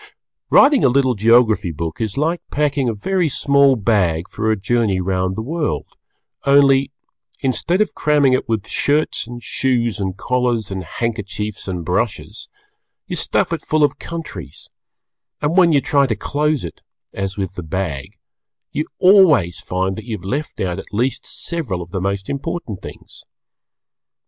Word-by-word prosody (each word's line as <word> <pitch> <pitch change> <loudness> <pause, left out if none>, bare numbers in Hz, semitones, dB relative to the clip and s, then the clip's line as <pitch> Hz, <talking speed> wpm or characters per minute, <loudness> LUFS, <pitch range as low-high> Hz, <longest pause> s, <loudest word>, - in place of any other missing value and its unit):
Writing 280 -2 +6
a - - +6
little 130 0 +3
Geography 110 -3 +3
Book 80 +4 -5
is 110 0 -2
like 165 +4 0
packing 145 -3 0
a - - -1
very 180 - 0
small 140 0 +4
bag 95 -6 +1
for 110 0 -2
a 110 - +3
journey 100 -1 +1
round 95 0 -1
the 110 - -3
world, 155 +4 -2 0.6
only 140 -1 +4 0.5
instead 140 - +1
of 215 - 0
cramming 145 -3 +3
it 130 -1 -1
with 110 -3 -1
shirts 145 -4 0
and 120 0 -9
shoes 120 -4 0
and 95 -2 -3
collars 125 -5 0
and 95 -1 -4
handkerchiefs 105 +1 -4
and 90 -3 -4
brushes, 105 +3 -2 0.6
you - - -4
stuff - - 0
it 165 - -2
full 155 -1 +1
of 145 -1 +1
countries, 125 - -8 0.7
and 150 +3 0
when 180 -3 +6
you 145 - +5
try 140 -4 +2
to 115 - 0
close 150 +6 -1
it 85 - -8 0.3
(as 95 0 -4
with 95 -2 -3
the 90 - -6
bag) 80 -5 -4 0.5
you 150 - -2
always 180 - +5
find 95 +1 -2
that 110 - -8
you 115 -3 -4
have 90 - -14
left 140 +9 -3
out 90 0 -2
at - - -10
least 120 +5 -1
several 150 - -3
of 85 0 -8
the 95 -2 -3
most 100 0 -2
important 140 - -4
things. - - -11
115 Hz, 165 wpm, -19 LUFS, 95-145 Hz, 0.7 s, Writing